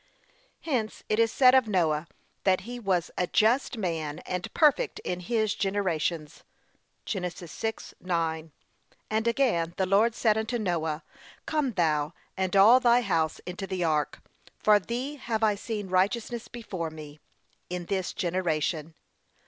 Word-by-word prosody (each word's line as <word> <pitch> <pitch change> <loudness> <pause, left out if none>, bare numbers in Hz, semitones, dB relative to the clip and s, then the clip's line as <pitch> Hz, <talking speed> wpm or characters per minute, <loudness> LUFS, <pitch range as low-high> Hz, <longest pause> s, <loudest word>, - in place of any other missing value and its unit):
Hence 245 -9 -2
it 215 - +1
is 225 -1 +4
said 255 +1 +6
of 260 -3 +5
Noah, 165 -5 +1 0.4
that 185 -1 +3
he 245 +4 -7
'was 185 -6 0
a 180 - +1
just 235 +6 +2
man, 160 -7 -2
and 180 -1 -4
perfect 300 -4 +3
in 180 0 -3
his 215 +3 0
generations.' 170 -6 -2 0.6
(Gen. 195 - -2
6:9) 170 -2 -3 0.6
And 220 +1 +1
again, 225 -10 +1
the 190 - +2
Lord 210 +5 +3
said 220 -2 +2
unto 225 +2 -2
Noah, 165 -7 -1 0.4
'Come 295 -6 0
thou 155 -5 +1 0.2
and 190 0 -1
all 215 +6 +8
thy 245 -1 +4
house 165 -8 0
into 185 +2 -5
the 185 -2 -2
ark, 155 -2 0 0.4
for 210 -1 +5
thee 255 +7 -4
have 225 -4 -2
I 215 -1 +4
seen 205 0 -4
righteous 215 +6 0
before 190 -8 -5
me, 155 -1 -11 0.5
in 180 -1 -4
this 190 0 -2
generation.' 165 -3 -1
190 Hz, 140 wpm, -28 LUFS, 170-225 Hz, 0.6 s, all